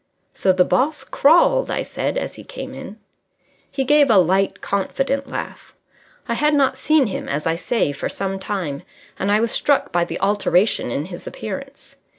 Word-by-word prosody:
"So 190 - +2
the 185 -1 +3
boss 280 +1 0
crawled?" 345 - +3
I - - -1
said, - - -3
as - - -3
he - - -12
came - - -8
in. - - -9 0.7
He 275 -1 -2
gave 290 +1 +4
a 220 - +6
light, 190 +2 +2
confident 270 +7 -2
laugh. - - -7 0.5
I - - -1
had 300 +5 +2
not 275 -2 +2
seen 310 -3 +3
him, 200 - -4
as 145 +2 -2
I 165 0 +1
say, 195 -1 0
for 140 - -4
some 195 0 -3
time, 185 -8 -4 0.4
and 195 - 0
I 210 - +4
was 230 0 0
struck 285 -1 +1
by 175 0 +2
the - - -5
alteration 200 - +1
in 140 +5 -2
his 175 -1 -9
appearance. 270 +7 -8
210 Hz, 180 wpm, -21 LUFS, 185-275 Hz, 0.7 s, a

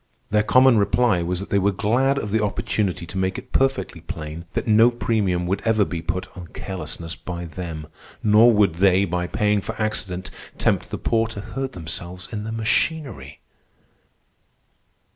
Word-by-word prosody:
Their 105 0 +4
common 130 +1 +5
reply 100 -1 +2
was 90 +1 -2
that 100 - -8
they 100 - +3
were 100 +1 +2
glad 120 +8 +1
of 105 -6 -3
the 110 0 +2
opportunity 100 -3 -1
to 90 - -7
make 95 0 0
it - - -9
perfectly 135 -11 0
plain 80 +1 -7
that - - -1
no 110 +2 +6
premium 105 -7 0
would 95 +2 -1
ever 110 -2 +2
be 85 -3 -4
put 90 +3 -2
on 90 -3 -8
carelessness 85 -3 -6
by 85 0 -6
them; 80 -2 -6 0.4
nor 110 +3 +6
would 105 -5 +3
they, 95 +1 +4
by 90 0 -2
paying 105 +2 +1
for - - -6
accident, 95 -4 -2 0.3
tempt - - +1
the - - -4
poor 115 0 +1
to 110 -3 -7
hurt 135 +5 -5
themselves 85 +2 -7
in 105 -1 -4
the 110 - -4
machinery. 110 - -1
100 Hz, 170 wpm, -23 LUFS, 90-110 Hz, 0.4 s, no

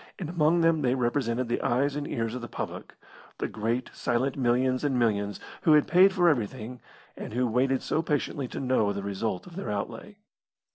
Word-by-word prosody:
And 175 -5 -5
among 170 0 +3
them 165 -1 +3
they 125 -2 +2
represented 120 -1 0
the 120 - -1
eyes 135 +4 +1
and 145 0 -3
ears 115 -1 -2
of 125 - -5
the 120 - -6
public - - -6 0.4
the - - -2
great 115 +3 -2
silent 130 +3 0
millions 130 0 +1
and 140 -3 +1
millions 105 -4 0 0.2
who 155 - +5
had 150 -1 +5
paid 185 +2 +6
for 180 -2 +2
everything, 120 -3 -1 0.3
and - - -7
who 125 +2 +1
waited 130 +3 +1
so 155 - 0
patiently 145 -3 -2
to - - -6
know 125 -6 +1
the 100 0 -5
result 100 -1 -3
of 175 - -12
their 195 - -5
outlay. 105 - -5
125 Hz, 195 wpm, -27 LUFS, 115-150 Hz, 0.4 s, paid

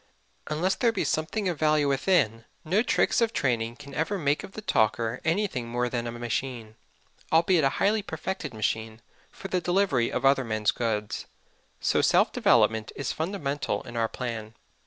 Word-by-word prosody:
Unless 170 +6 +1
there 235 - +2
be 215 - -1
something 185 +6 -1
of 175 -4 -2
value 155 -2 +3
within, 135 - +1 0.2
no 185 +7 +2
tricks 240 - +2
of 230 -1 +2
training 115 -3 0
can 140 +1 -12
ever 165 +8 -1
make 145 -4 0
of 195 - -10
the 215 - -7
talker 115 - +1
anything 160 - 0
more 120 +1 -1
than 120 -1 -2
a - - -3
machine 120 -1 -4 0.6
albeit 165 0 +4
a 135 - +4
highly 215 +2 +2
perfected 190 -1 -5
machine 110 0 -3 0.3
for - - -9
the 180 -1 0
delivery 175 -9 +1
of - - -2
other 135 0 +4
men's 110 -2 +1
goods. 105 -3 -2 0.5
So - - +2
self - - +4
development 110 -1 +3
is 135 - -3
fundamental 155 -5 -2
in 120 - -10
our 115 -1 +1
plan. 115 -3 -5
135 Hz, 170 wpm, -27 LUFS, 115-175 Hz, 0.6 s, albeit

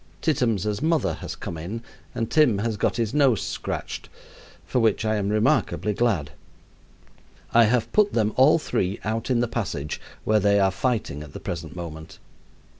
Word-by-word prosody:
Tittums' 110 - 0
mother 155 - +1
has - - -6
come 85 - -6
in 105 +9 -5 0.3
and 115 - -2
Tim 150 -10 +4
has 110 +2 -1
got 100 - 0
his 115 -1 -1
nose 135 -8 +4
scratched, - - -5 0.6
for 125 - 0
which 110 -1 +2
I 110 0 +1
am 100 -1 -1
remarkably 105 -1 +1
glad. 100 -9 0 1.2
I 115 0 +7
have 115 +1 +1
put 210 -1 +3
them 110 -2 +1
all 135 +5 +6
three 95 - -1
out 110 +3 -2
in 120 -2 +2
the 120 - +1
passage, 95 -11 -3 0.2
where 110 0 +3
they 100 0 +3
are 95 -1 +3
fighting 105 - -1
at 75 -2 -10
the - - -7
present 85 -3 -6
moment. 80 -2 -8
110 Hz, 170 wpm, -24 LUFS, 95-120 Hz, 1.2 s, I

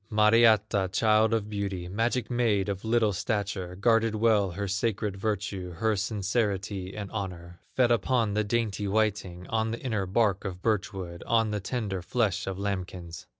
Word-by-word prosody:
Mariatta, 110 -2 +4
child 110 +2 +3
of 110 -2 0
beauty, 100 -4 -3
Magic 115 +5 0
maid 110 -5 +1
of 95 -1 -3
little 110 -2 +2
stature, 95 -3 -2
Guarded 115 +2 +2
well 105 -3 +3
her 100 +2 -3
sacred 105 0 -1
virtue, 100 -3 -3
Her 110 +4 +1
sincerity 100 -1 -2
and 100 -2 -5
honor, 90 -5 -6 0.2
Fed 125 -2 +4
upon 115 -2 +2
the 105 +1 +1
dainty 105 -2 -1
whiting, 100 -4 -1
On 110 0 0
the 115 - -4
inner 110 -7 -2
bark 100 -1 +1
of 90 -2 -6
birch 105 -2 +1
wood, 90 -4 -7
On 115 -2 +2
the 105 - -1
tender 100 -3 -3
flesh 100 0 0
of 95 -1 -3
lambkins. 90 -4 -5
105 Hz, 160 wpm, -28 LUFS, 95-110 Hz, 0.2 s, Mariatta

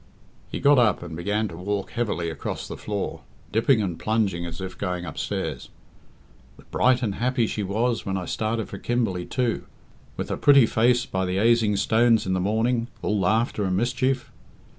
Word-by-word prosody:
He - - -3
got 140 -1 +5
up 110 -7 +3
and 85 -2 -7
began 105 +6 -1
to - - -9
walk 100 +3 -3
heavily 100 -8 -1
across 75 - -5
the - - -6
floor, 105 -2 -4 0.3
dipping 110 +1 +3
and 90 -4 -3
plunging 100 -6 0
as 80 -1 -7
if 95 -1 -6
going 90 -2 -3
upstairs. 80 - -4 0.9
"The - - -16
bright 130 0 +2
and 105 -4 0
happy 120 +2 +1
she 105 - -3
was 115 +5 0
when 95 0 -2
I 90 - -4
started 110 +2 -2
for 100 - -7
Kimberley, 110 -8 -1
too; 125 -4 -1 0.5
with - - -4
her - - -2
pretty 140 -4 +6
face 120 +3 +2
by 95 -5 -2
the 90 +1 -1
aising 110 0 +3
stones 115 +2 +3
in 95 - 0
the 95 - +1
morning, 115 +5 +1 0.2
all 105 -1 +1
laughter 110 +3 +1
and 95 -1 0
mischief. 130 +3 0
110 Hz, 185 wpm, -25 LUFS, 95-120 Hz, 0.9 s, pretty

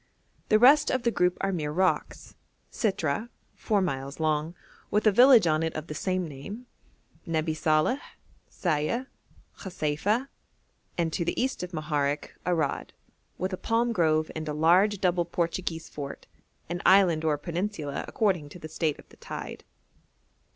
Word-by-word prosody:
The 215 - +6
rest 275 +6 +6
of 255 -2 0
the 235 - +2
group 180 -4 +1
are 195 - 0
mere 150 -4 -2
rocks: 185 +4 -1 0.4
Sitrah, 195 -1 -1 0.2
four 205 -4 0
miles 135 -4 -4
long, 155 +1 0 0.3
with 210 +1 +1
a 215 - +6
village 245 0 +7
on 155 -1 +2
it 160 0 -2
of 155 - -4
the 150 - -6
same 185 +2 -1
name; 160 - -8 0.6
Nebi 160 -1 0
Saleh, 155 - +2 0.5
Sayeh, 175 - -1 0.5
Khaseifa, 190 - -1 0.7
and, 165 -2 0
to 170 - 0
the 170 - -2
east 260 +2 -1
of 180 0 -5
Moharek, 150 -3 -1 0.2
Arad, 160 -6 -1 0.4
with 185 +1 -2
a - - -2
palm 235 +4 +1
grove 155 -4 +2
and 155 -1 -4
a - - -2
large 180 +7 +4
double 180 -2 +2
Portuguese 170 -1 -3
fort, 140 -2 -7 0.4
an 175 +1 -4
island 185 -5 +5
or 155 -2 +2
a - - -7
peninsula 170 -2 -3
according 185 -9 0
to 165 - -11
the 155 - -8
state 155 -1 -1
of - - -16
the - - -19
tide. - - -7
170 Hz, 160 wpm, -27 LUFS, 155-200 Hz, 0.7 s, village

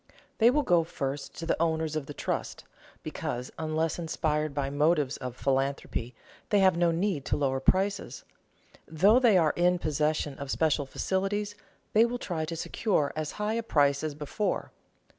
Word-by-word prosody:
They 230 +1 +7
will 295 +4 +2
go 175 -6 +3
first 135 -3 -5
to 165 - -5
the 165 - 0
owners 160 -1 0
of 150 -3 -3
the 145 - -6
trust, - - -3 0.4
because, 125 +1 -4
unless 160 +1 -1
inspired 155 -2 -1
by 140 -1 -2
motives 150 -1 +2
of 125 -2 -6
philanthropy, 135 -2 -1 0.3
they 205 - +3
have 190 -3 +5
no 170 0 +3
need 170 -3 0
to - - 0
lower 135 -2 0
prices. 190 -2 0 0.6
Though 195 +10 +4
they 235 -7 +5
are 160 -4 +3
in 180 +1 +3
possession 150 -2 -1
of 140 -1 -6
special 150 -2 +1
facilities, 200 +6 -1 0.4
they 220 - +6
will 245 +1 -3
try 170 -9 -3
to 165 +1 -5
secure 165 -3 0
as 155 -1 -3
high 210 +1 -2
a 230 - 0
price 145 -9 +2
as 155 -2 -3
before. 150 +8 -2
160 Hz, 170 wpm, -28 LUFS, 145-190 Hz, 0.6 s, They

